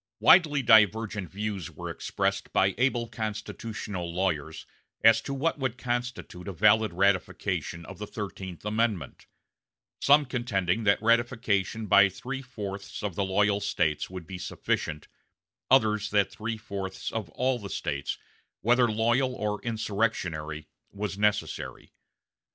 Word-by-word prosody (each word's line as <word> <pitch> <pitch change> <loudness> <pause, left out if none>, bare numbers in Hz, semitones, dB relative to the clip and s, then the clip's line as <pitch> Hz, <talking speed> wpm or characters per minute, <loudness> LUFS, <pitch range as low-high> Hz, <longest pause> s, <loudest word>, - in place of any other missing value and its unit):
Widely 150 -6 +6
divergent 110 -3 +4
views 100 -4 -4
were 80 - -7
expressed - - -2
by 95 0 +3
able 125 -2 +1
constitutional 110 -4 -5
lawyers 80 -4 -2 0.4
as 115 0 +7
to - - -6
what 145 +3 -1
would 130 -3 -2
constitute 120 -7 -4
a - - -2
valid 110 +5 +4
ratification 90 -2 0
of - - -10
the 105 - -5
Thirteenth 95 -4 -7
Amendment; 105 -7 -1 0.7
some 145 +1 +6
contending 115 -5 -1
that 100 - +4
ratification 115 -2 +1
by 100 -1 +6
three 125 +8 -6
fourths 100 -6 -7
of 105 -3 -2
the 100 - -1
loyal 100 +2 +2
States 75 -6 0
would 90 -2 -7
be 90 +2 -7
sufficient, 75 -3 -3 0.6
others 110 -5 +3
that 100 -2 +2
three 110 +1 -4
fourths 100 -3 -5
of 110 -7 -4
all 125 +7 0
the 100 -2 -7
States, 70 -6 -3 0.4
whether 120 +1 +4
loyal 120 +4 +1
or 105 -3 -2
insurrectionary, 100 -9 -2 0.2
was 100 -1 -4
necessary. 105 0 -1
105 Hz, 130 wpm, -28 LUFS, 95-115 Hz, 0.7 s, as